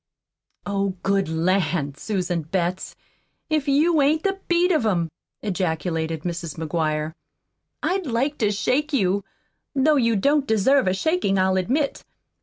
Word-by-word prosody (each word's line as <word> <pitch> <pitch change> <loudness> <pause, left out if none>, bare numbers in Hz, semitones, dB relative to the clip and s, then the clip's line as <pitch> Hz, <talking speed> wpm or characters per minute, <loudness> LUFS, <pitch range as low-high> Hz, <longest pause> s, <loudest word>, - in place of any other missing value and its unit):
"Oh, 195 -1 -1
good 195 -3 +1
lan', 160 -3 0
Susan 180 0 -2
Betts, 175 +3 -2 0.6
if 305 -2 +1
you 305 +3 +3
ain't 305 +3 +2
the 390 0 -1
beat 350 +1 +3
of 315 -8 +2
'em!" 170 -7 0 0.3
ejaculated 165 -4 -2
Mrs. 170 -3 -4
McGuire. 155 -1 -1 0.7
"I'd 375 -3 0
like 265 +5 -1
to 210 - +2
shake 280 +9 0
you 200 -5 +1 0.5
though 290 +2 +4
you 230 -3 +2
don't 280 +7 +2
deserve 240 +3 +3
a 185 - +2
shakin', 315 - +1
I'll 190 0 +2
admit. 260 - 0
200 Hz, 135 wpm, -23 LUFS, 175-280 Hz, 0.7 s, though